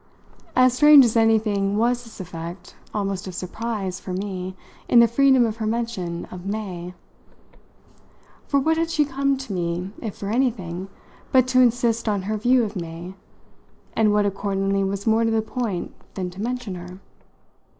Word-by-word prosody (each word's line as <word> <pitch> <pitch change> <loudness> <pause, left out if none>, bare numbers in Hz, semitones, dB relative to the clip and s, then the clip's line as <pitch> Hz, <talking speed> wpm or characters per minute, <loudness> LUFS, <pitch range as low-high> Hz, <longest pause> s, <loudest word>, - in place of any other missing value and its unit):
As 255 -1 +5
strange 295 0 +8
as 230 - 0
anything 215 -3 +2
was 240 +2 +1
this 225 - -13
effect 175 0 -8 0.2
almost 195 -2 -3
of 185 - -7
surprise 195 0 -4
for 185 - -6
me 185 -1 -4 0.3
in 240 - +7
the 235 - +7
freedom 265 +1 +4
of 220 -1 -3
her 220 -1 -2
mention 215 -7 -3
of 180 -1 -8
"May." 185 -4 -5 1.5
For 280 - +2
what 320 +4 +1
had 330 0 0
she 315 -3 +2
come 275 0 0
to 260 -6 -6
me, 175 +1 -2
if 215 -4 -5
for 200 0 -4
anything, 195 -8 -1 0.4
but 255 -2 +5
to 255 0 +5
insist 235 -2 +2
on 200 -2 -1
her 215 +3 -2
view 245 +3 +3
of 215 -1 -4
May, 170 +1 -6 0.8
and 215 -2 +3
what 210 0 +3
accordingly 195 0 0
was 195 +1 -3
more 225 0 +3
to 225 - +2
the 225 -1 +1
point 220 -6 -3 0.2
than 185 -2 -3
to 185 +3 -8
mention 245 -3 -3
her? 180 0 -9
210 Hz, 170 wpm, -23 LUFS, 185-240 Hz, 1.5 s, strange